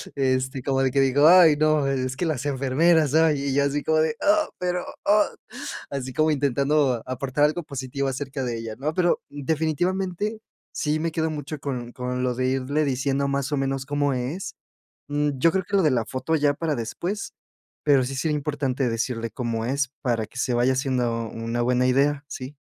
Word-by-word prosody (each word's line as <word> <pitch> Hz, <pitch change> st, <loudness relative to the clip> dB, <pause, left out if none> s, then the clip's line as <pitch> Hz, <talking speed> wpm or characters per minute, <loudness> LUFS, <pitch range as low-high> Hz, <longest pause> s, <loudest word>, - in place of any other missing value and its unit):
este, 130 Hz, -1 st, 0 dB
como 135 Hz, 0 st, 0 dB
de 130 Hz, -, +2 dB
que, 140 Hz, -, +1 dB
dijo: 135 Hz, +2 st, +3 dB
"Ay, 170 Hz, -3 st, +8 dB
no, 155 Hz, -2 st, +2 dB
es 130 Hz, -1 st, -1 dB
que 180 Hz, -, -1 dB
las 145 Hz, -4 st, -2 dB
enfermeras, 145 Hz, +3 st, +2 dB
ay" 160 Hz, -2 st, +4 dB
y 140 Hz, -, -2 dB
ella 140 Hz, +1 st, +2 dB
así 145 Hz, +1 st, 0 dB
como 155 Hz, 0 st, +2 dB
de: 160 Hz, +8 st, +1 dB
"Ah, 310 Hz, +1 st, +3 dB
pero 180 Hz, 0 st, -1 dB, 0.2 s
ah", 210 Hz, +1 st, +4 dB, 0.6 s
así 130 Hz, -2 st, -4 dB
como 155 Hz, +2 st, +2 dB
intentando 140 Hz, -2 st, +1 dB
aportar 130 Hz, +3 st, 0 dB
algo 155 Hz, +3 st, 0 dB
positivo 140 Hz, -1 st, -3 dB
acerca 135 Hz, 0 st, -4 dB
de 120 Hz, -2 st, -2 dB
ella, 115 Hz, -1 st, -6 dB
¿no? 150 Hz, +4 st, -2 dB
Pero 175 Hz, -1 st, +2 dB
definitivamente, 175 Hz, +8 st, -1 dB, 0.3 s
sí 150 Hz, +1 st, -1 dB
me 165 Hz, 0 st, -1 dB
quedo 160 Hz, -1 st, 0 dB
mucho 150 Hz, -1 st, -5 dB
con 125 Hz, -4 st, -5 dB
con 125 Hz, 0 st, -3 dB
lo 125 Hz, -1 st, 0 dB
de 130 Hz, 0 st, 0 dB
irle 135 Hz, +3 st, 0 dB
diciendo 135 Hz, +1 st, 0 dB
más 140 Hz, 0 st, -1 dB
o 145 Hz, -, +1 dB
menos 135 Hz, 0 st, -1 dB
cómo 145 Hz, 0 st, 0 dB
es. 130 Hz, +9 st, -4 dB, 0.5 s
Mm, 145 Hz, 0 st, +1 dB
yo 165 Hz, +6 st, +4 dB
creo 190 Hz, 0 st, -1 dB
que 200 Hz, -, -2 dB
lo 190 Hz, -, +3 dB
de 150 Hz, -, +4 dB
la 115 Hz, -3 st, +1 dB
foto 160 Hz, +5 st, -2 dB
ya 145 Hz, -1 st, +2 dB
para 155 Hz, 0 st, -2 dB
después, 175 Hz, -, -4 dB, 0.5 s
pero 140 Hz, -3 st, +4 dB
sí 135 Hz, -, -4 dB
sería 150 Hz, +2 st, 0 dB
importante 140 Hz, -3 st, -1 dB
decirle 115 Hz, 0 st, -2 dB
cómo 115 Hz, -2 st, -3 dB
es, 135 Hz, +2 st, 0 dB
para 115 Hz, -4 st, 0 dB
que 115 Hz, -, -14 dB
se 125 Hz, -, 0 dB
vaya 120 Hz, +2 st, +3 dB
haciendo 125 Hz, -3 st, -1 dB
una 115 Hz, +1 st, -2 dB
buena 125 Hz, +1 st, +2 dB
idea, 140 Hz, +2 st, +2 dB
sí. 135 Hz, +1 st, -7 dB
140 Hz, 195 wpm, -24 LUFS, 130-155 Hz, 0.6 s, Ay